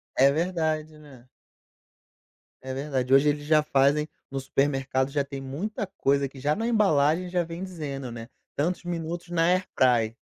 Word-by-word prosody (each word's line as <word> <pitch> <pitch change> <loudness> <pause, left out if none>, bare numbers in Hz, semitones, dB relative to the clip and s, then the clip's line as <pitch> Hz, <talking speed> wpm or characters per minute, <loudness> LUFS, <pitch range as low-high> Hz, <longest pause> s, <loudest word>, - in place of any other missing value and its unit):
É 135 +1 +6
verdade, 155 -2 -1
né. 130 -5 -15 1.3
É 130 0 -5
verdade, 135 -2 -1
hoje 140 +2 +6
eles 145 0 -2
já 155 0 +4
fazem 150 +1 +2 0.2
no 135 - -2
supermercado 135 0 0
já 145 -1 +1
tem 140 -1 -7
muita 175 +11 -4
coisa 140 -7 0
que 135 0 -13
já 145 +3 +1
na 225 +2 -2
embalagem 180 -6 +3
já 175 -1 +1
vem 165 +2 -7
dizendo, 140 -8 -5
né: 115 0 -8 0.3
"Tantos 175 +6 -1
minutos 170 0 -4
na 165 -1 +1
airfryer". 125 -11 +2
150 Hz, 155 wpm, -26 LUFS, 135-170 Hz, 1.3 s, É